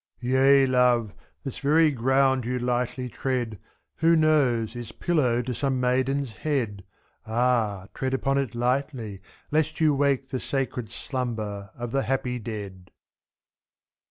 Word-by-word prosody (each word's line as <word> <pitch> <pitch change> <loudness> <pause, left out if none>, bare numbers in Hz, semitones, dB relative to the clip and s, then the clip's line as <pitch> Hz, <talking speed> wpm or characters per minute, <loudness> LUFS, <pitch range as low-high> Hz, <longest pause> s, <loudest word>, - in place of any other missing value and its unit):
Yea, 135 +2 +5
love, 125 -4 +2 0.3
this 135 -4 -6
very 155 +2 +4
ground 130 +1 +2
you 125 +2 -2
lightly 125 +1 -1
tread, 120 -4 -3 0.4
Who 165 +1 +4
knows! 130 -8 +2
is 120 -1 -6
pillow 125 -9 +1
to 125 +1 -3
some 130 +2 -1
maiden's 130 +1 +1
head; 115 -10 -2 0.4
4^. - - -8
Ah! 110 -5 +1
tread 130 0 -1
upon 135 +1 +1
it 130 -4 -3
lightly, 120 -4 -1 0.3
lest 155 0 0
you 155 -2 +4
wake 140 -1 +1
The 130 - -2
sacred 130 -5 -3
slumber 110 -5 -4
of 120 -1 -5
the 135 - +1
happy 125 -2 -1
dead. 100 -5 -7
125 Hz, 135 wpm, -26 LUFS, 115-135 Hz, 0.4 s, Yea